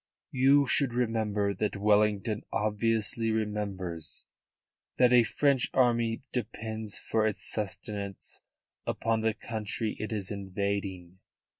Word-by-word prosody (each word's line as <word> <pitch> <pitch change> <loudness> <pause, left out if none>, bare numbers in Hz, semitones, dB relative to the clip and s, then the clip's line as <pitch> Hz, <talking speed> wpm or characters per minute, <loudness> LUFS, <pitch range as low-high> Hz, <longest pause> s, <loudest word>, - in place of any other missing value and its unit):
"You 135 +2 +5
should 130 -2 +3
remember 110 -4 0
what 105 0 -2
Wellington 105 +1 +2
obviously 110 +1 +1
remembers: 100 -7 -2 0.7
that 125 -1 +5
a 125 - +8
French 135 +2 +2
army 120 -2 +2
depends 110 -2 -3
for 110 -1 +1
its 105 - -3
sustenance 100 -1 -4 0.5
upon 115 -1 0
the 110 -1 +1
country 110 0 -3
it 110 - -4
is 105 -2 -2
invading. 95 -2 -3
110 Hz, 110 wpm, -29 LUFS, 100-115 Hz, 0.7 s, a